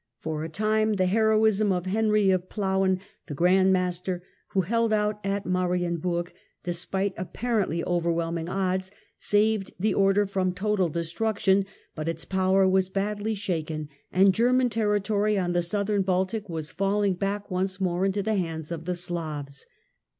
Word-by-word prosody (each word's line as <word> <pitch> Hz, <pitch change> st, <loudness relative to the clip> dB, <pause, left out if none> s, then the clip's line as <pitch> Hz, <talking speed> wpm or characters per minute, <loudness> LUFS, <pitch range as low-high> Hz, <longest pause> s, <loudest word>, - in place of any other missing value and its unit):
For 155 Hz, +4 st, -4 dB
the 160 Hz, -, -4 dB
time, 215 Hz, +5 st, +1 dB
the 185 Hz, -2 st, +1 dB
heroism 215 Hz, 0 st, +3 dB
of 180 Hz, -1 st, -1 dB
Henry 210 Hz, 0 st, +2 dB
of 185 Hz, -1 st, -1 dB
Plauen, 190 Hz, -2 st, +1 dB, 0.3 s
the 145 Hz, -, -5 dB
Grand 185 Hz, +4 st, +4 dB
Master, 180 Hz, -1 st, -1 dB, 0.2 s
who 190 Hz, -, +1 dB
held 230 Hz, +5 st, +1 dB
out 210 Hz, 0 st, 0 dB
at 200 Hz, +1 st, -2 dB
Marienburg 175 Hz, -1 st, -1 dB, 0.3 s
despite 190 Hz, +3 st, -1 dB
apparently 185 Hz, -2 st, -1 dB
overwhelming 170 Hz, -1 st, -1 dB
odds, 185 Hz, 0 st, -1 dB, 0.3 s
saved 210 Hz, -1 st, +2 dB
the 210 Hz, +2 st, +1 dB
Order 195 Hz, +1 st, +3 dB
from 190 Hz, -2 st, -1 dB
total 195 Hz, -1 st, 0 dB
destruction; 190 Hz, +4 st, 0 dB, 0.3 s
but 155 Hz, +1 st, -3 dB
its 165 Hz, 0 st, -4 dB
power 190 Hz, 0 st, +3 dB
was 190 Hz, 0 st, +2 dB
badly 205 Hz, +2 st, -2 dB
shaken 160 Hz, -6 st, -3 dB, 0.2 s
and 190 Hz, +1 st, +5 dB
German 250 Hz, +3 st, +3 dB
Territory 210 Hz, -1 st, +1 dB
on 175 Hz, -2 st, 0 dB
the 175 Hz, -, +2 dB
Southern 200 Hz, +3 st, 0 dB
Baltic 190 Hz, +2 st, -1 dB
was 160 Hz, -2 st, -4 dB
fall 200 Hz, +1 st, 0 dB
ing 200 Hz, -2 st, +2 dB
back 200 Hz, +2 st, -3 dB
once 185 Hz, +1 st, -1 dB
more 180 Hz, -1 st, 0 dB
into 195 Hz, +1 st, 0 dB
the 220 Hz, +2 st, 0 dB
hands 165 Hz, -5 st, -3 dB
of 165 Hz, -1 st, -5 dB
the 180 Hz, 0 st, -1 dB
Slavs. 155 Hz, -6 st, -5 dB
190 Hz, 155 wpm, -26 LUFS, 175-205 Hz, 0.3 s, and